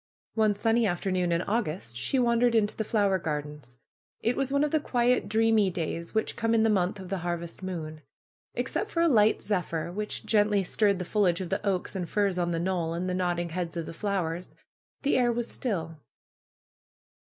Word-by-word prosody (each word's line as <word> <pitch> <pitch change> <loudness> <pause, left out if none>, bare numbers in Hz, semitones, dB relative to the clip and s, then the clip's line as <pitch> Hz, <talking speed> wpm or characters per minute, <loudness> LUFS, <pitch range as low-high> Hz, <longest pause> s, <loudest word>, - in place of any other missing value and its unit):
One 215 -2 +2
sunny 225 +2 +2
afternoon 180 -1 0
in 170 +1 +1
August 170 - -2
she 130 - -1
wandered 240 -1 +3
into 210 -2 +2
the 220 - -1
fiower 200 -4 +1
gardens. 150 -4 -5 0.5
It 235 +2 +1
was 270 -1 -1
one 280 +1 +3
of 300 - 0
the 315 - +3
quiet, 245 -5 +1
dreamy 220 -2 +3
days 170 0 -4
which 220 - 0
come 230 0 +1
in 220 - +4
the 225 - +4
month 195 0 +1
of 185 -1 -8
the 195 -1 -2
harvest 170 0 -4
moon. 160 -4 -5 0.5
Except 425 - -2
for 335 - 0
a 340 - +5
light 220 -7 +4
zephyr, 175 -5 -2
which 210 +3 -3
gently 205 -2 +3
stirred 200 +2 +2
the 180 - -4
fo 210 +4 0
liage 180 -2 +3
of 185 -2 -4
the - - -1
oaks 195 -1 -1
and 180 -3 -3
firs 200 -3 +1
on 175 -1 +1
the 170 - -1
knoll, 170 -2 -1
and 180 +2 -2
the 180 - -1
nodding 175 -1 -1
heads 170 0 -4
of 165 - -2
the - - -7
fiowers, 180 -2 -3 0.5
the 280 - +3
air 240 -1 +3
was 235 0 -1
still. 165 - -3
195 Hz, 200 wpm, -28 LUFS, 170-225 Hz, 0.5 s, a